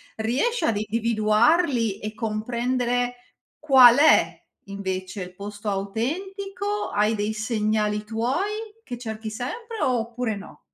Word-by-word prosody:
Riesci 260 - 0
ad 220 -3 +1
individuarli 230 - +2
e 215 +1 -5
comprendere 245 +3 -1 0.4
qual 260 -5 +7
è 310 - +5 0.3
invece 190 -1 -4
il 180 - -10
posto 205 +2 -6
autentico? 385 - -3
Hai 210 +2 +2
dei 210 +1 -1
segnali 215 -1 0
tuoi, 355 - -2
che 245 - -6
cerchi 220 -2 -6
sempre, 445 - -6
oppure 240 -2 -1
no? 200 0 -11
230 Hz, 110 wpm, -24 LUFS, 215-260 Hz, 0.4 s, qual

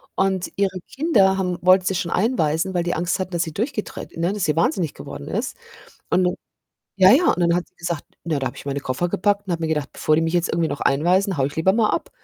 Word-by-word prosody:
und 190 -2 0
ihre 190 -2 0
Kinder 215 - +2
haben 180 -2 -1
wollten 185 +1 +5
sie 190 +1 0
schon 175 -2 -2
einweisen, 185 -5 +1
weil 175 -1 0
die 175 - -1
Angst 175 +4 -1
hatten, 185 0 -3
dass 170 -1 0
sie 160 - -5
durchgedreht 215 - -4
ne, 170 +2 0
dass 205 -2 -1
sie 150 - +1
Wahnsinnig 165 -1 +1
geworden 70 - -9
ist - - -3 0.5
und 185 0 +3 0.7
ja, 190 0 +7
ja, 335 +7 +4
und - - -6
dann 170 -1 +3
hat 175 0 -2
sie 185 - -41
gesagt 170 -3 -3 0.2
„Na, 160 -4 -1
da 135 - -2
habe - - -11
ich - - -11
meine 140 0 -2
Koffer 130 +7 -2
gepackt 205 +3 0
und 185 - -2
habe 165 - -2
mir 160 - -1
gedacht, 150 -3 -1
bevor 155 - +1
die 165 - +2
mich 165 +1 -1
jetzt 175 -1 +1
irgendwie 165 -1 0
noch 145 - -5
einweisen, 180 +7 +2
haue 135 -2 +1
ich 145 - -6
lieber 160 +4 +3
mal 215 0 +2
ab.“ - - -2
175 Hz, 255 wpm, -22 LUFS, 160-190 Hz, 0.7 s, ja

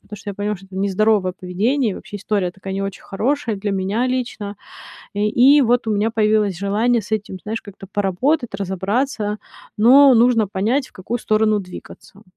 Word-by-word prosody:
потому 210 - -11
что 205 +1 -6
я 200 - -8
поняла, 205 +1 -2
что 195 - -16
это 190 0 -11
нездоровое 200 0 +1
поведение, 210 +7 -1
и - - -6
вообще 205 - -9
история 200 -2 -1
такая, 195 +1 -8
не 195 - -2
очень 195 -1 -5
хорошая 235 +3 -1
для 205 +1 -3
меня 195 +6 -1
лично. 235 -5 -3 0.6
Э, - - -2
и 245 +8 +5
вот 245 -2 +2
у - - +1
меня 210 +2 0
появилось 215 -3 +1
желание 215 +5 +1
с 205 - -14
этим, 210 -3 -2
знаешь, 220 +2 -4
как-то 195 -1 -12
поработать, 210 - 0
разобраться, 205 +3 -2 0.4
но 265 +5 +7
нужно 235 -2 +4
понять, 220 +8 -1
в - - -31
какую 225 +6 -4
сторону 215 -1 +1
двигаться. 190 +1 -12
210 Hz, 185 wpm, -20 LUFS, 195-235 Hz, 0.6 s, но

